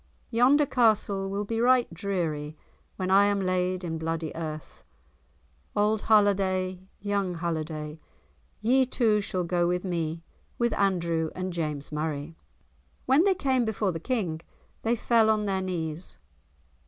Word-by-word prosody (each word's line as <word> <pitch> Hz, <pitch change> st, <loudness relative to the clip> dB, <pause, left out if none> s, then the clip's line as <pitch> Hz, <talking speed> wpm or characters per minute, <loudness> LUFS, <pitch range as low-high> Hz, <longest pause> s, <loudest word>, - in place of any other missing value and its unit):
Yonder 260 Hz, +5 st, +5 dB
castle 210 Hz, -6 st, +2 dB
will 200 Hz, +1 st, -2 dB
be 225 Hz, +2 st, -2 dB
right 250 Hz, -5 st, +3 dB
dreary 160 Hz, -5 st, -3 dB, 0.4 s
when 185 Hz, -1 st, -2 dB
I 200 Hz, +1 st, +6 dB
am 205 Hz, 0 st, +1 dB
laid 185 Hz, -1 st, 0 dB
in 160 Hz, -2 st, -3 dB
bloody 165 Hz, -1 st, -3 dB
earth. 155 Hz, -2 st, -7 dB, 0.9 s
Auld 210 Hz, +1 st, +2 dB
Halliday, 190 Hz, -3 st, +2 dB
young 200 Hz, -3 st, -1 dB
Halliday, 160 Hz, -2 st, -4 dB, 0.6 s
ye 255 Hz, +4 st, +3 dB
two 220 Hz, -4 st, +2 dB
shall 185 Hz, -3 st, -2 dB
go 175 Hz, 0 st, +1 dB
with 180 Hz, +2 st, -1 dB
me, 165 Hz, -2 st, -2 dB, 0.3 s
with 235 Hz, -2 st, +1 dB
Andrew 170 Hz, -5 st, +1 dB
and 185 Hz, 0 st, -3 dB
James 150 Hz, -4 st, -3 dB
Murray." 150 Hz, 0 st, -3 dB, 0.7 s
When 275 Hz, +7 st, +4 dB
they 390 Hz, -2 st, +4 dB
came 265 Hz, -6 st, +1 dB
before 215 Hz, -3 st, 0 dB
the 165 Hz, -, -5 dB
King 175 Hz, -6 st, -2 dB, 0.4 s
they 230 Hz, +1 st, +1 dB
fell 225 Hz, -1 st, +3 dB
on 215 Hz, -1 st, +2 dB
their 190 Hz, -1 st, 0 dB
knees. 170 Hz, -2 st, -4 dB
185 Hz, 140 wpm, -27 LUFS, 165-215 Hz, 0.9 s, I